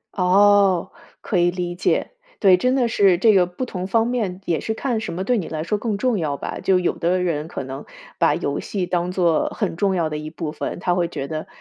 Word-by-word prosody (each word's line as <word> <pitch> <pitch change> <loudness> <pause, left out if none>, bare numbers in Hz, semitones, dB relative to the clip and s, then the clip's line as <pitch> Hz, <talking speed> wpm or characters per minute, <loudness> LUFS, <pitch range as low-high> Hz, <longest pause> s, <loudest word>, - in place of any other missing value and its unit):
哦， 195 0 +4 0.3
可 195 - -1
以 175 0 +4
理 175 -1 -3
解。 180 - 0 0.3
对， 190 -3 +6
真 255 +7 +1
的 250 -3 +2
是 195 -5 +3
这 220 +4 +4
个 185 -2 +5
不 180 +9 -5
同 185 -6 -5
方 225 +3 +2
面 215 -7 -2
也 170 -2 0
是 220 - -3
看 235 -1 -2
什 220 - -5
么 185 +3 -3
对 245 +3 +1
你 185 - -3
来 155 -1 -4
说 210 +5 -1
更 210 -1 -2
重 240 -2 0
要 150 -4 -1
吧。 - - -5
就 190 - +3
有 180 -1 +1
的 180 +2 +1
人 155 -3 -1
可 - - -5
能 135 +1 -7 0.3
把 - - +3
游 - - -2
戏 190 -3 -3
当 175 0 -1
作 175 -4 +1
很 - - -2
重 195 +2 +1
要 165 -3 0
的 150 - -4
一 155 0 -6
部 160 -1 -5
分， - - -5
他 180 0 0
会 175 -1 +1
觉 145 -5 -5
得， 155 0 -5
180 Hz, 260 characters per minute, -21 LUFS, 170-205 Hz, 0.3 s, 对